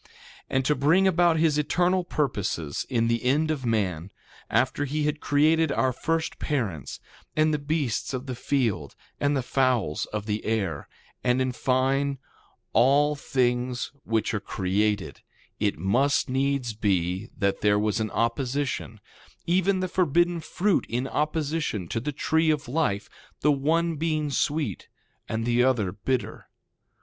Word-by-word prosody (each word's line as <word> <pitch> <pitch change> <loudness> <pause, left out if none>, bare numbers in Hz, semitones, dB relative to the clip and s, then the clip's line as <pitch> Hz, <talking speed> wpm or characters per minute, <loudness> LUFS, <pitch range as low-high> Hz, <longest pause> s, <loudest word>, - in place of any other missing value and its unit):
2:15 - - -25 0.4
And 130 0 0
to 150 - +3
bring 155 +8 +3
about 175 -2 +3
his 155 -2 +3
eternal 180 +4 +2
purposes 100 - -2
in 115 -3 +1
the 115 +1 0
end 150 +5 +2
of 135 -5 -3
man, 95 -6 -1 0.4
after 130 +5 +1
he 150 +2 -1
had 150 0 0
created 155 +2 +3
our 130 -2 +1
first 165 +5 -2
parents, 105 - -3 0.4
and 155 0 +3
the 150 - 0
beasts 145 -4 -1
of 130 0 -4
the 130 - -4
field 115 - -1 0.2
and 145 0 +1
the 130 - -1
fowls 125 - +1
of 105 -1 -4
the 105 0 -2
air, 100 -9 -2 0.3
and 125 0 +2
in 130 0 +1
fine, 135 +2 +1 0.6
all 140 +5 +4
things 125 -2 -1
which 110 0 0
are 105 - 0
created, 100 +1 -1 0.4
it 105 -1 0
must 130 - +2
needs 135 -2 0
be 95 -1 -1
that 100 -2 0
there 105 0 +4
was 105 +1 0
an 110 -1 -1
opposition; 120 -1 -2 0.5
even 185 +2 +2
the 185 - 0
forbidden 175 -1 +2
fruit 185 +4 0
in 125 +3 -1
opposition 150 - -1
to 115 - -2
the 150 +6 -3
tree 160 +3 +1
of 150 -4 0
life; 125 -8 0 0.3
the 150 - +4
one 160 +4 +1
being 155 -2 -1
sweet 145 - -1 0.4
and 115 0 -2
the 120 0 +3
other 120 -8 +2
bitter. 120 +6 -3
130 Hz, 150 wpm, -26 LUFS, 110-150 Hz, 0.6 s, all